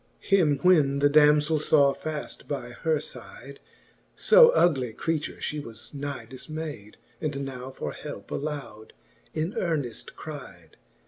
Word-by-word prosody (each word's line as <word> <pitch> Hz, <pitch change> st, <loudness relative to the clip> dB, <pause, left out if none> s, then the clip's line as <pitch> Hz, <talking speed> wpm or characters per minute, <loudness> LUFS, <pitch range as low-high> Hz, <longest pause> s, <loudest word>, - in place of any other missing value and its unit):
Him 165 Hz, -8 st, +3 dB
when 150 Hz, -7 st, +5 dB
the 145 Hz, 0 st, +3 dB
damzell 150 Hz, +1 st, +5 dB
faw 145 Hz, -2 st, +4 dB
faft 155 Hz, +1 st, -6 dB
by 130 Hz, -4 st, -4 dB
her 155 Hz, +5 st, 0 dB
fide, -, -, -9 dB, 0.6 s
So 480 Hz, +1 st, +7 dB
ugly 135 Hz, -, +2 dB
creature, 160 Hz, +4 st, -2 dB
(he 150 Hz, -, -3 dB
was 115 Hz, -3 st, -9 dB
nigh 145 Hz, 0 st, -5 dB
difmayd. 145 Hz, -5 st, -7 dB, 0.3 s
And 140 Hz, -2 st, -2 dB
now 130 Hz, -1 st, -7 dB
for 135 Hz, -, -5 dB
helpe -, -, -9 dB
aloud 140 Hz, -8 st, -5 dB, 0.4 s
in 160 Hz, +5 st, -1 dB
earneft 150 Hz, -10 st, -2 dB
cride. 150 Hz, -3 st, -10 dB
145 Hz, 130 wpm, -26 LUFS, 135-155 Hz, 0.6 s, So